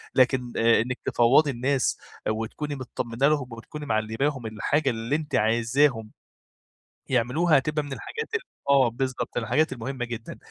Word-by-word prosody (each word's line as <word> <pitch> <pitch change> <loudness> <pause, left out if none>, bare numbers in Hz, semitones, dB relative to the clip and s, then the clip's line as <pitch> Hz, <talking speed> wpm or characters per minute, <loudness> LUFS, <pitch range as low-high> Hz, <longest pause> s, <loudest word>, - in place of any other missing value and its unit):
لكن 125 -1 +2
إنِك 115 +2 +3
تفوّضي 135 +5 +4
الناس 130 +1 0 0.3
وتكوني 115 +7 -3
متطمنة 125 0 -1
لهم 145 -4 +1
وبتكوني 145 +6 -8
معلّماهم 115 +4 -1
الحاجة 135 +7 0
اللي 115 +3 -1
أنتِ 155 0 -3
عايزاهم 115 +1 +2 1.0
يعملوها، 135 +7 +3
هتبقى 150 +2 0
من 140 -1 -6
الحاجات 455 - -6
ال - - +2 0.3
آه 135 -3 +5
بالضبط، 130 +2 -3
من 120 - 0
الحاجات 130 +5 +1
المهمة 130 +1 -4
جدًا، 115 -1 -7
130 Hz, 135 wpm, -26 LUFS, 115-145 Hz, 1.0 s, آه